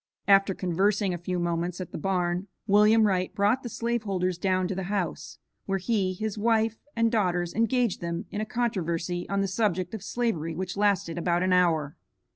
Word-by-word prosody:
After 195 Hz, -1 st, +5 dB
conversing 195 Hz, +2 st, +1 dB
a -, -, -3 dB
few 180 Hz, +1 st, -3 dB
moments 175 Hz, +1 st, -2 dB
at 185 Hz, -, -6 dB
the -, -, -5 dB
barn, 180 Hz, +1 st, -1 dB, 0.2 s
William 210 Hz, +2 st, +5 dB
Wright 185 Hz, -3 st, +1 dB
brought 210 Hz, +5 st, +2 dB
the 240 Hz, -, -6 dB
slave 235 Hz, 0 st, -1 dB
holders 185 Hz, -4 st, -1 dB
down 185 Hz, -1 st, +1 dB
to -, -, -1 dB
the 190 Hz, 0 st, -4 dB
house, 195 Hz, -6 st, -3 dB, 0.3 s
where 195 Hz, 0 st, +1 dB
he, 190 Hz, -1 st, 0 dB
his 215 Hz, +2 st, -4 dB
wife 225 Hz, 0 st, +1 dB, 0.2 s
and 230 Hz, 0 st, +2 dB
daughters 180 Hz, -6 st, 0 dB
engaged 230 Hz, -1 st, +1 dB
them 170 Hz, 0 st, -3 dB
in 210 Hz, -, -3 dB
a -, -, -1 dB
controversy 175 Hz, -7 st, -2 dB
on 200 Hz, 0 st, +1 dB
the 195 Hz, -, 0 dB
subject 190 Hz, -2 st, -1 dB
of 220 Hz, -, -5 dB
slavery 175 Hz, -10 st, -2 dB
which 180 Hz, +1 st, -4 dB
lasted 195 Hz, -5 st, +1 dB
about 175 Hz, +1 st, +1 dB
an 185 Hz, 0 st, +2 dB
hour. 165 Hz, -5 st, +2 dB
190 Hz, 190 wpm, -27 LUFS, 175-215 Hz, 0.3 s, After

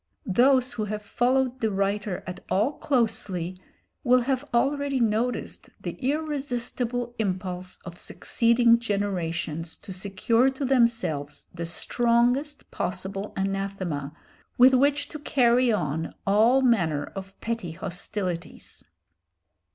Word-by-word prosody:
Those 255 Hz, +5 st, +3 dB
who 215 Hz, -, -2 dB
have 210 Hz, 0 st, -4 dB
followed 255 Hz, +4 st, +1 dB
the 220 Hz, -, +1 dB
writer 200 Hz, -1 st, -1 dB
at 180 Hz, -1 st, -6 dB
all 215 Hz, +8 st, +2 dB
closely 200 Hz, -, -1 dB, 0.4 s
will 250 Hz, 0 st, +5 dB
have 260 Hz, +1 st, 0 dB
already 275 Hz, +2 st, +1 dB
noticed 230 Hz, +2 st, -1 dB
the -, -, -4 dB
irresistible 250 Hz, -4 st, -2 dB
impulse 185 Hz, -3 st, -1 dB
of 175 Hz, -1 st, -7 dB
succeeding 235 Hz, 0 st, +3 dB
generations 175 Hz, -7 st, -2 dB
to 190 Hz, -, -9 dB
secure 200 Hz, +7 st, +2 dB
to 270 Hz, +1 st, -4 dB
themselves 230 Hz, -, +1 dB
the 170 Hz, -1 st, -4 dB
strongest 240 Hz, -, +1 dB
possible 195 Hz, +2 st, -4 dB
anathema 195 Hz, -7 st, -2 dB, 0.5 s
with 255 Hz, +2 st, +7 dB
which 285 Hz, +2 st, +3 dB
to 305 Hz, -, -7 dB
carry 250 Hz, -3 st, +3 dB
on 160 Hz, -5 st, -2 dB
all 225 Hz, +7 st, +4 dB
manner 170 Hz, -, +2 dB
of 195 Hz, 0 st, -8 dB
petty 230 Hz, -8 st, -3 dB
hostilities. 180 Hz, 0 st, -5 dB
220 Hz, 110 wpm, -26 LUFS, 185-250 Hz, 0.5 s, with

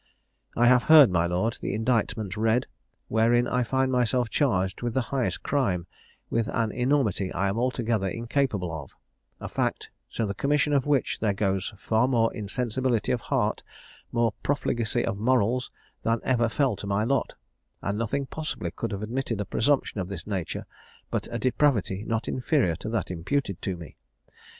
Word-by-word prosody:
"I 120 Hz, -, +4 dB
have 125 Hz, 0 st, +6 dB
heard, 150 Hz, -9 st, +9 dB
my 85 Hz, -1 st, +2 dB
lord, 90 Hz, +7 st, -1 dB
the -, -, -2 dB
indictment 110 Hz, -3 st, 0 dB
read, 110 Hz, +3 st, +2 dB, 0.4 s
wherein 120 Hz, +2 st, +3 dB
I 125 Hz, +1 st, +1 dB
find 130 Hz, +2 st, +1 dB
myself 125 Hz, -1 st, +1 dB
charged 95 Hz, -10 st, +1 dB
with 120 Hz, -2 st, -2 dB
the 130 Hz, -, +3 dB
highest 130 Hz, -3 st, -1 dB
crime, 100 Hz, -12 st, 0 dB, 0.4 s
with 115 Hz, -2 st, 0 dB
an 115 Hz, -2 st, 0 dB
enormity 125 Hz, -7 st, +1 dB
I 95 Hz, +3 st, 0 dB
am 100 Hz, +4 st, -1 dB
altogether 120 Hz, -5 st, 0 dB
incapable 115 Hz, -, -1 dB
of; 75 Hz, -4 st, -8 dB, 0.4 s
a -, -, -5 dB
fact, -, -, -2 dB, 0.2 s
to 115 Hz, -, 0 dB
the 100 Hz, -, -2 dB
commission 145 Hz, +6 st, +1 dB
of 140 Hz, -1 st, +2 dB
which 145 Hz, -3 st, +1 dB
there 105 Hz, -3 st, +1 dB
goes 95 Hz, -1 st, 0 dB
far 110 Hz, +4 st, +2 dB
more 115 Hz, -3 st, +2 dB
insensibility 120 Hz, +2 st, -1 dB
of -, -, 0 dB
heart, -, -, 0 dB, 0.5 s
more 115 Hz, -1 st, +2 dB
profligacy 120 Hz, -4 st, 0 dB
of 110 Hz, -3 st, -2 dB
morals, 125 Hz, +1 st, +2 dB, 0.3 s
than 115 Hz, 0 st, +1 dB
ever 120 Hz, -3 st, +2 dB
fell 130 Hz, -1 st, +1 dB
to 100 Hz, -, -7 dB
my 100 Hz, +1 st, +1 dB
lot; 135 Hz, +4 st, 0 dB, 0.5 s
and 100 Hz, +2 st, -1 dB
nothing 135 Hz, +5 st, -1 dB
possibly 155 Hz, +3 st, -4 dB
could 115 Hz, -, -4 dB
have 100 Hz, +1 st, -4 dB
admitted 115 Hz, -1 st, -2 dB
a 105 Hz, -, -1 dB
presumption 130 Hz, -1 st, +1 dB
of 90 Hz, -, -4 dB
this 95 Hz, -4 st, -7 dB
nature 95 Hz, -5 st, -3 dB, 0.5 s
but -, -, -2 dB
a 120 Hz, -, -3 dB
depravity 120 Hz, -5 st, +1 dB
not 115 Hz, -1 st, -1 dB
inferior 130 Hz, -, +1 dB
to 110 Hz, -, -6 dB
that 110 Hz, -5 st, -2 dB
imputed 95 Hz, +3 st, -2 dB
to 95 Hz, -3 st, -3 dB
me. 85 Hz, -3 st, -11 dB
115 Hz, 170 wpm, -26 LUFS, 100-130 Hz, 0.5 s, heard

